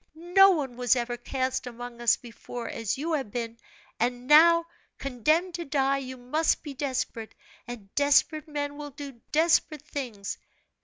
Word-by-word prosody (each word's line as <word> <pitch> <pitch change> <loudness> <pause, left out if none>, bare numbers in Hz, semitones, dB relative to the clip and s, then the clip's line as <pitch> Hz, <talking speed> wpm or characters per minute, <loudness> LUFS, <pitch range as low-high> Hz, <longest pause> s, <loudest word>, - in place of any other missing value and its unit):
No 355 +4 +5
one 280 -9 -1
was 250 +1 +3
ever 240 0 -2
cast 260 +1 -2
among 245 0 -8
us 235 - +4
before 240 0 -8
as 225 -1 -3
you 320 +4 -2
have 270 -8 -1
been; 230 +1 -5 0.4
and 245 +1 -1
now, 335 +4 +7 0.3
condemned 310 +8 0
to 340 0 -4
die, 275 -2 +1
you 260 -1 -7
must 280 +7 0
be 290 - -6
desperate, 255 -5 -3 0.3
and 220 -5 -9
desperate 290 +2 +3
men 290 -1 -4
will 295 -1 -6
do 275 -4 -10
desperate 315 -1 +2
things. 245 -10 -5
270 Hz, 155 wpm, -27 LUFS, 245-305 Hz, 0.4 s, now